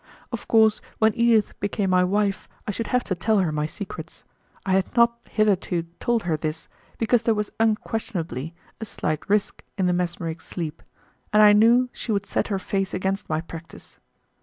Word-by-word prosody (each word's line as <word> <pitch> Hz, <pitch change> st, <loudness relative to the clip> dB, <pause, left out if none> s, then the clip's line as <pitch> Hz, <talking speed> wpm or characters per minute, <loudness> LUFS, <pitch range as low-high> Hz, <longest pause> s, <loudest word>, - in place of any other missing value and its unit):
Of 235 Hz, -, -6 dB
course, 220 Hz, -1 st, +4 dB, 0.2 s
when 220 Hz, 0 st, +3 dB
Edith 230 Hz, -2 st, +2 dB
became 200 Hz, -1 st, -1 dB
my 180 Hz, 0 st, +4 dB
wife 200 Hz, +1 st, 0 dB, 0.2 s
I -, -, 0 dB
should 230 Hz, +3 st, -4 dB
have 250 Hz, -1 st, +1 dB
to -, -, -2 dB
tell 215 Hz, +4 st, +1 dB
her 180 Hz, -5 st, +2 dB
my 150 Hz, 0 st, -1 dB
secrets. 200 Hz, +5 st, -8 dB, 0.4 s
I 190 Hz, -, -1 dB
had 190 Hz, 0 st, +1 dB
not 235 Hz, 0 st, +4 dB
hitherto 195 Hz, -5 st, +1 dB, 0.2 s
told 235 Hz, -2 st, +1 dB
her 170 Hz, -2 st, 0 dB
this, 155 Hz, +1 st, -4 dB, 0.3 s
because 230 Hz, +1 st, +2 dB
there 225 Hz, -1 st, +2 dB
was 210 Hz, 0 st, -2 dB
unquestionably 185 Hz, -, -1 dB, 0.2 s
a 220 Hz, -, -4 dB
slight 155 Hz, -6 st, -3 dB
risk 205 Hz, 0 st, 0 dB
in 190 Hz, -, +1 dB
the 180 Hz, -, +2 dB
mesmeric 170 Hz, -2 st, -2 dB
sleep, 165 Hz, -3 st, -5 dB, 0.5 s
and 215 Hz, 0 st, +6 dB
I 210 Hz, 0 st, +8 dB
knew 235 Hz, +4 st, +5 dB
she 230 Hz, -, -4 dB
would 200 Hz, -1 st, 0 dB
set -, -, -1 dB
her 200 Hz, -, -1 dB
face 195 Hz, 0 st, -2 dB
against 190 Hz, +2 st, -2 dB
my 155 Hz, 0 st, 0 dB
practice. 165 Hz, 0 st, -11 dB
200 Hz, 185 wpm, -24 LUFS, 175-220 Hz, 0.5 s, I